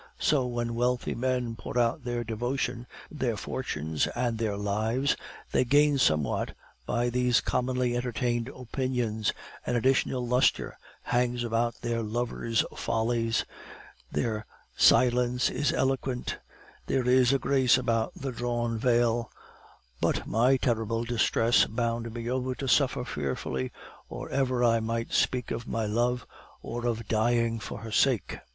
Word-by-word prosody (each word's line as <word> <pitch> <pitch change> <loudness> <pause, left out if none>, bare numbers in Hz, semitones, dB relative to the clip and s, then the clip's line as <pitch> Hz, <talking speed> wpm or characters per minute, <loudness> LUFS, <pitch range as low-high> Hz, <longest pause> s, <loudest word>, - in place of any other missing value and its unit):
So 135 -4 +2
when 120 -1 -2
wealthy 125 +1 0
men 125 -2 -1
pour 120 - -6
out 120 +3 +1
their 120 -1 -2
devotion, 120 +2 -2 0.2
their 125 -7 -1
fortunes, 80 - -2
and 120 -2 -1
their 105 -3 -1
lives, 110 +7 0 0.4
they - - +3
gain 145 +2 +4
somewhat 75 - +1 0.3
by 120 +1 0
these 125 0 +3
commonly 125 -1 0
entertained 120 -1 -1
opinions, 125 -4 -2 0.3
an 125 - -1
additional 130 0 +2
lustre 125 +2 +2 0.3
hangs 120 0 0
about 115 0 -1
their 120 -1 -1
lovers' 115 +1 -1
follies; 115 0 0 0.7
their 110 +8 -2 0.3
silence 125 0 +4
is 140 +3 +1
eloquent; 130 -1 -1 0.5
there 130 -2 0
is 125 0 +5
a 135 - +4
grace 130 -2 +3
about 115 -3 0
the 135 -1 -4
drawn 120 -1 -2
veil; 120 -1 +2 0.7
but - - +1
my 125 +5 +3
terrible 115 -2 0
distress 115 0 +3
bound 115 0 -2
me 115 0 -5
over 130 +1 -1
to 135 - -4
suffer 135 -1 +2
fearfully 65 - -3 0.4
or - - -7
ever 130 -2 +1
I 115 -1 +4
might 115 +1 -3
speak 125 -2 +1
of 115 +1 -4
my 115 -1 -1
love 120 +4 0 0.4
or 120 +1 -3
of 115 -1 -2
dying 115 +1 +1
for - - -7
her 115 -1 -7
sake. 120 -1 +1
120 Hz, 135 wpm, -28 LUFS, 115-125 Hz, 0.7 s, is